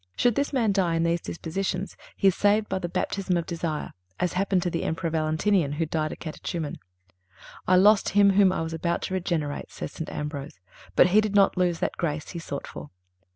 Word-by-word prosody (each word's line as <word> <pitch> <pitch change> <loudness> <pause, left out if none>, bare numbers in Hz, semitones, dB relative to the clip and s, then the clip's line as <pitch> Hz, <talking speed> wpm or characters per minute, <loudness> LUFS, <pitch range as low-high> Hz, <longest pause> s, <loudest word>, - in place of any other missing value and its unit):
Should 245 - +3
this 280 +5 -1
man 235 -7 +2
die 185 -4 +1
in 165 - +1
these 170 0 +1
dispositions, 185 +3 -4 0.2
he 195 - +4
is - - 0
saved 205 +3 +2
by 190 - -2
the 175 -2 -4
_baptism 185 +1 -1
of 170 - -2
__ - - -31
desire_, 165 -3 -3 0.3
as 180 - 0
happened 190 -1 +1
to 175 - -1
the 165 - -2
Emperor 165 +1 -2
Valentinian 155 +1 +1
who 165 +2 -1
died 155 -1 -2
a - - -5
Catechuman: 160 -1 -5 0.9
"I 185 - +5
lost 205 +3 +5
him 200 -1 +7
whom 195 -1 +5
I 185 - -1
was 160 0 -4
about 170 +1 -1
to - - -3
regenerate," 170 -6 -2
says - - -6
St. 160 - -6
Ambrose, 145 - -6 0.4
"but 180 - +6
he 210 +4 +5
did 210 -1 -2
not 200 -1 +5
lose 180 -2 +1
that - - -1
grace 150 -3 -2
he 170 - -6
sought 145 -4 -5
for." 75 0 -9
175 Hz, 215 wpm, -26 LUFS, 160-195 Hz, 0.9 s, him